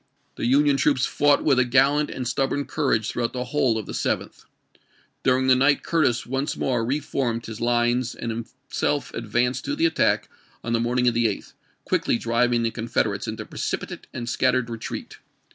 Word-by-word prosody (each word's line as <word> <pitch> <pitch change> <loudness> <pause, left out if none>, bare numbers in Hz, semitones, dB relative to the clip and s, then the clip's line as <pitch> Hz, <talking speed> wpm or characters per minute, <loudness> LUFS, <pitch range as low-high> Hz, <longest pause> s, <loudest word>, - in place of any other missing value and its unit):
The - - -2
Union 140 +2 +4
troops 140 -2 +2
fought 145 0 +2
with 135 -4 +3
a - - +5
gallant 140 +4 +3
and 130 -2 -4
stub 135 +2 0
born 145 0 -2
courage 125 -5 0
throughout 120 -1 -2
the 125 -1 -2
whole 125 -3 +1
of 110 - -4
the - - -7
7th. - - -3 0.8
During 130 0 +2
the 130 -1 +6
night 140 +3 +3
Curtis 145 -8 +1
once 135 +3 -2
more 125 -3 0
re 135 +6 0
formed 120 -5 -2
his 110 0 -7
lines 120 +1 +1
and 115 - -4
himself 130 +4 -3
advanced 120 +3 -1
to 290 - -1
the 325 +3 +1
attack 335 - +2 0.4
on 115 - -2
the 115 - +2
morningof 120 +1 +2
the 115 0 +2
8th, 105 - -5 0.3
quickly - - +1
driving 115 +1 +1
the 115 - 0
Confederates 110 -3 -1
into 110 0 -5
precipitate - - -5
and 120 - -6
scattered 125 -1 +1
retreat. 115 -1 -6
125 Hz, 180 wpm, -24 LUFS, 115-135 Hz, 0.8 s, the